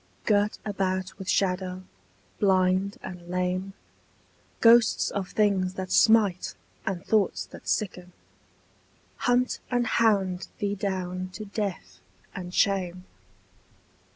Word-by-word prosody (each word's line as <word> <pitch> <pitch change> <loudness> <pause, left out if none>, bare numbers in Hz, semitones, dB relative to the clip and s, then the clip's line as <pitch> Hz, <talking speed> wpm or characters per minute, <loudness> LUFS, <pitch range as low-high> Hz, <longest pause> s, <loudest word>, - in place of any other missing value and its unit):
Girt 205 0 +2
about 190 -2 -2
with 190 - -6
shadow, 185 -1 0 0.6
blind 190 0 +2
and 175 -1 -8
lame, 180 +2 -1 0.9
Ghosts 230 -1 +5
of 195 -2 -3
things 190 -3 +1
that 185 -1 -5
smite 215 -5 +4 0.3
and 185 -2 -3
thoughts 210 -4 +1
that - - -13
sicken 180 -3 -2 1.1
Hunt 245 +1 +1
and 245 -1 +1
hound 200 -6 +1
thee 205 -1 -1
down 185 -2 -3
to 215 +4 -7
death 195 - -4 0.3
and 180 -2 -6
shame. 185 -2 0
190 Hz, 105 wpm, -27 LUFS, 185-205 Hz, 1.1 s, Ghosts